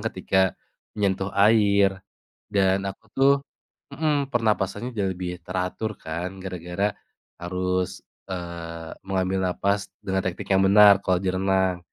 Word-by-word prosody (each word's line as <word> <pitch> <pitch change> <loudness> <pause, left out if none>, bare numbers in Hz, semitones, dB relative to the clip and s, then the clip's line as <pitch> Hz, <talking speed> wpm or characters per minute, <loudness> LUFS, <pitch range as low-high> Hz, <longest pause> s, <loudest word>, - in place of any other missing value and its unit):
ketika 95 -2 0 0.4
menyentuh 95 -1 0
air, 100 -2 +4 0.5
dan 95 -1 +2
aku 100 +3 -6
tuh 135 +1 +5 0.6
mhm, 145 -2 +1
pernapasannya 115 -2 0
jauh 95 -2 +1
lebih 90 -1 -5
teratur 90 +4 -3
kan 85 +4 -5
gara-gara 90 +2 -2 0.5
harus, 90 +1 -2 0.2
eee, 85 -2 -6 0.2
mengambil 95 0 0
napas 100 +2 0 0.2
dengan 95 0 0
teknik 90 -1 -4
yang 95 0 +4
benar 100 0 +8
kalo 95 -2 +1
di 95 - +1
renang. 95 -1 +1
95 Hz, 120 wpm, -25 LUFS, 90-100 Hz, 0.6 s, benar